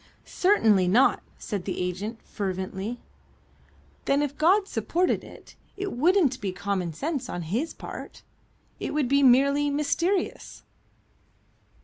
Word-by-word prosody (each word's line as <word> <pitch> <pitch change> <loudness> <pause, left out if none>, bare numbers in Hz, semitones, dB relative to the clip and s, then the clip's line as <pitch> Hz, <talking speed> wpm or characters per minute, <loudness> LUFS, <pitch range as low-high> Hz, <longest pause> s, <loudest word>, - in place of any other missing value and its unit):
"Certainly 220 - +3
not," 235 +9 +4 0.2
said 200 -5 -5
the 190 - -3
agent, 195 +6 -4
fervently. 190 +3 -4 1.0
"Then 280 +1 +2
if 285 -1 -3
God 380 +7 +3
supported 360 -1 0
it, - - -14 0.2
it 395 0 -3
wouldn't 300 -2 +3
be 195 -2 -2
common 190 -2 -2
sense 280 - -3
on 175 - -4
His 230 - -2
part. - - -9 0.6
It - - -4
would 295 -4 +1
be 280 +2 +3
merely 280 +3 +4
mysterious?" 335 +6 -1
260 Hz, 120 wpm, -26 LUFS, 195-305 Hz, 1.0 s, not